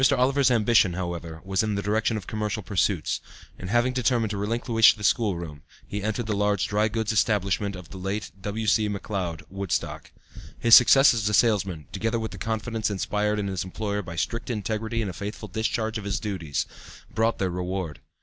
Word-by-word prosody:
Oliver's 135 +2 +3
ambition, 110 -5 +4
however, 85 -2 -5
was 95 0 +1
in 110 -2 -1
the 100 - -1
direction 110 +2 +1
of 105 - -7
commercial 105 -1 -3
pursuits, 95 -2 0 0.4
and 90 - -6
having 120 +3 +2
determined 120 -3 +1
to 105 - -3
relinquish 115 +2 +4
the 105 - -10
schoolroom, 85 - 0 0.2
he 105 - -4
entered 110 +3 -2
the 105 -1 -1
large 100 -4 +1
dry 105 +1 +2
goods 110 0 -1
establishment 100 -2 +1
of 90 -2 -10
the 95 - -9
late 95 +3 -3
W. 105 +3 -3
C. 105 0 +3
McLeod, 95 -5 -4
Woodstock. 95 -4 -3 0.5
His 115 -1 +3
success 135 +2 +7
as 105 -3 0
a 105 - +2
salesman, 95 - +2
together 115 +1 -1
with 110 -1 -4
the - - -9
confidence 110 -1 -2
inspired 105 +1 -1
in 105 - -1
his 95 -2 -2
employer 100 +2 -3
by 85 -3 -8
strict 115 +8 -2
integrity 110 +1 -2
and 100 - -3
a - - -11
faithful 105 +4 -6
discharge 110 +2 -2
of - - -8
his 100 - -1
duties, 90 -9 -3 0.5
brought 115 +1 +1
their 95 -2 -1
reward. 90 -2 -4
105 Hz, 190 wpm, -26 LUFS, 95-110 Hz, 0.5 s, success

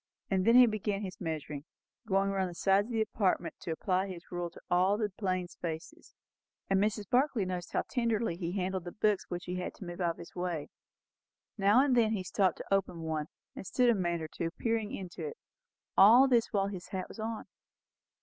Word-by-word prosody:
And 190 -1 +2
then 230 - +6
he 250 0 +10
began 210 -2 -1
his 185 -2 -7
measurements, 150 -2 -4 0.4
going 195 0 +2
round 190 -2 0
the 175 - -9
sides 195 +3 +3
of - - -8
the 225 -1 +2
apartment 190 -5 0
to - - -7
apply 185 +4 0
his 175 -3 -9
rule 175 -1 -3
to - - -14
all 185 +3 +3
the 210 -2 -1
plain 185 -4 -1
spaces; 175 - -7 0.6
and 195 0 +4
Mrs. 210 -1 0
Barclay 250 -4 +2
noticed 180 -1 -4
how - - +1
tenderly 230 -6 0
he 175 0 -4
handled 190 -2 -2
the 175 - -5
books 210 -1 0
which 175 0 -4
he 180 0 -3
had 180 - -4
to 195 - -9
move 175 +1 -6
out 170 -1 +1
of - - -26
his 170 - -11
way. 175 -4 -3 0.9
Now 210 +6 +5
and 265 -3 +3
then 225 -2 +4
he 195 -4 -2
stopped 185 +1 +1
to - - -4
open 185 -3 0
one, 155 -2 -2 0.3
and - - -6
stood 245 +5 +3
a - - +4
minute 175 -4 -1
or - - -4
two 165 +1 -3
peering 225 -2 0
into 185 -3 -6
it. 455 +1 -5 0.6
All 235 +7 +8
this 235 -3 +3
while 195 -2 +1
his 185 -3 -7
hat 185 -1 -4
was - - -12
on. 220 0 -4
195 Hz, 215 wpm, -31 LUFS, 175-215 Hz, 0.9 s, he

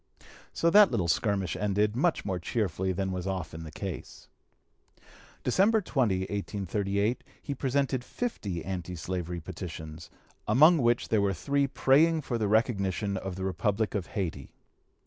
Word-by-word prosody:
So 170 - +1
that 205 +1 +8
little 95 -8 0
skirmish 100 0 0
ended, 105 +2 +1
much 160 +6 +1
more 95 -3 -2
cheerfully 95 -1 -1
than 95 +1 -2
was 90 0 -4
often 90 -4 -4
the 80 -2 -8
case. 95 +1 -7 1.1
December 200 - +3
20, 125 - 0
1838, 100 +2 -2 0.2
he 140 - -4
presented 135 -1 0
fifty 100 - -4
anti 90 -2 -4
slavery 90 0 -4
petitions, 80 -2 -8 0.4
among 155 +10 +6
which 120 -1 +2
were 100 -3 +3
three 140 - +1
praying 155 +5 +3
for 120 -4 -3
the 105 - +1
recognition 100 -2 +1
of 95 -1 -4
the 95 - -5
Republic 105 +3 0
of 100 -4 -2
Hayti. 80 -8 -3
100 Hz, 140 wpm, -29 LUFS, 95-125 Hz, 1.1 s, that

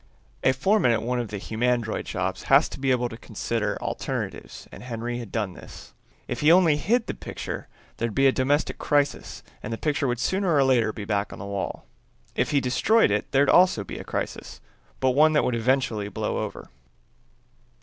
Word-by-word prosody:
A - - +5
foreman 175 - +2
at 115 -2 +1
one 125 +1 -1
of 120 - -2
the 105 - -5
humandroid 115 +2 -1
shops 95 -1 -3
has 135 +3 +6
to - - -9
be 135 0 0
able 125 -1 +2
to 115 -2 -9
consider 110 -1 -3
alternatives - - -5
and - - -11
Henry 120 0 -4
had 115 -5 -8
done 105 -5 -2
this. - - -12 0.3
If 120 - -4
he 150 +2 +5
only 170 -4 +5
hid 230 +8 +1
the - - -4
picture - - -6 0.3
there'd 115 -2 -2
be 135 - +3
a 135 - +7
domestic 140 +3 0
crisis 145 -1 0 0.2
and 110 - -6
the 115 - -2
picture 145 0 0
would 120 0 0
sooner 190 +5 0
or 140 - +5
later 120 -5 +3
be 105 -1 -7
back 100 -1 -1
on - - -8
the 100 - -7
wall; 100 -1 -4 0.5
if - - 0
he 145 - +3
destroyed 135 - +3
it 105 +1 -1
there'd 140 +1 +4
also 180 - +5
be - - -7
a - - -6
crisis, - - -5 0.4
but 130 -1 +3
one 155 +4 +5
that 150 - +3
would 125 - 0
eventually 115 -3 0
blow - - -2
over. - - -6
125 Hz, 200 wpm, -25 LUFS, 110-145 Hz, 0.5 s, a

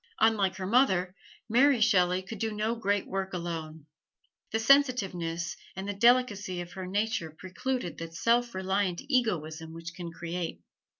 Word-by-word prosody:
Unlike 200 -4 +3
her 190 -1 -5
mother, 185 -5 +3 0.3
Mary 255 +3 +4
Shelley 185 -4 +3
could 205 +2 -8
do 225 +1 -1
no 215 +2 -1
great 205 -4 0
work 195 0 -3
alone. 160 -3 -5 0.7
The 220 - +1
sensitiveness 195 -10 +2 0.2
and 190 +1 -5
the 205 - -2
delicacy 205 -4 +3
of 175 -1 -6
her 185 -1 -6
nature 205 -3 -1
precluded 185 +6 -4
that 165 0 -7
self 235 +6 +2
reliant 190 -1 -1
egoism 160 - 0
which 165 +1 -8
can 170 -1 -7
create. 170 0 -5
190 Hz, 145 wpm, -29 LUFS, 175-225 Hz, 0.7 s, Mary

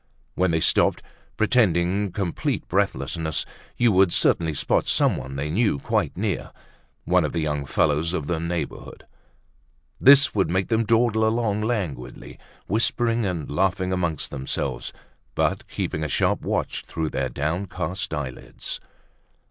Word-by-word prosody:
When 95 0 +1
they 80 -1 +1
stopped, - - +2 0.3
pretending 100 -4 +2
complete 90 -2 -2
breathlessness, 80 -3 -1 0.3
you 120 -2 +4
would 95 -2 +4
certainly 80 -2 +2
spot - - +1
someone 65 +1 +1
they 75 +2 -3
knew 105 -3 +2
quite - - -1
near, - - -2 0.5
one - - +3
of - - -2
the 85 - 0
young 75 -2 -1
fellows 75 +4 +1
of 80 -5 -2
the 80 +2 -1
neighborhood. 85 0 -5 0.9
This 140 0 +7
would 100 -3 +1
make 95 +2 0
them 115 -1 +2
dawdle 115 0 +3
along 110 -2 0
languidly, 95 - -4 0.3
whispering 115 +1 +1
and 85 -5 -3
laughing 95 +3 0
among 85 -4 0
themselves, 65 -2 -3 0.4
but - - 0
keeping 80 - -3
a 80 - -2
sharp - - +1
watch - - -2
through 80 -2 -3
their 65 -1 -1
downcast 85 +3 -3
eyelids. 70 -5 -5
85 Hz, 135 wpm, -24 LUFS, 75-105 Hz, 0.9 s, This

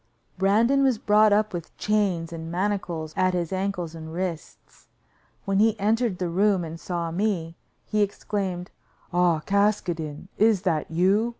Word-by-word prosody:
Brandon 225 +8 +3
was 265 -4 +3
brought 210 0 +4
up 210 0 +2
with 170 -2 -7
chains 190 -6 0
and 165 0 -6
manacles 175 -4 -2
at 185 0 +2
his 175 0 -2
ankles 185 -3 -2
and 160 -1 -8
wrists. 175 -1 -6 0.6
When 195 -1 +1
he 220 0 +3
entered 220 0 +1
the 180 - -2
room 190 +1 +2
and 165 0 -7
saw 170 -2 -3
me, 170 -3 -1 0.3
he 215 -1 0
exclaimed: 195 -3 -2 0.4
"Ah! 175 -3 +3
Caskoden, 180 -6 0
is 215 -3 +4
that 165 -6 0
you? 190 +8 +2
185 Hz, 145 wpm, -25 LUFS, 170-210 Hz, 0.6 s, brought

